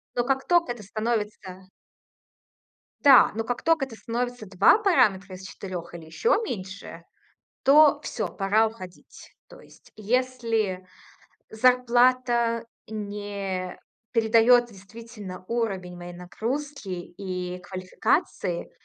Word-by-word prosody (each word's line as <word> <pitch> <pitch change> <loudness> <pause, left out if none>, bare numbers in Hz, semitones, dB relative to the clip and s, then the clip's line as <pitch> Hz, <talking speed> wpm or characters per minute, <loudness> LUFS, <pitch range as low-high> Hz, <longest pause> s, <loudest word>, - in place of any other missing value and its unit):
Но 240 - +1
как 265 0 -1
тока 345 -6 +3
это 230 - -12
становится 210 -3 -4 1.4
Да. 275 -4 +7
Но 225 - -2
как 245 +1 -3
тока 325 -4 +3
это 225 -4 -12
становится 245 -1 -4
2 190 - +5
параметра 200 - +2
из 185 - -12
4 180 -3 -7
или 165 -2 -9
ещё 460 - +1
меньше, 190 - -7 0.6
то 295 +2 +6
всё, - - -3
пора 210 +3 +2
уходить. 185 -5 -11 0.2
То - - -14
есть - - -20
если 225 -4 -1 0.6
зарплата 240 0 +3 0.2
не 200 -3 -5 0.3
передает 230 +1 +5
действительно 200 -1 -11
уровень 195 -7 -2
моей 175 0 -9
нагрузки 235 +8 -5
и 180 0 -5
квалификации 185 -1 -2
220 Hz, 110 wpm, -25 LUFS, 185-245 Hz, 1.4 s, Да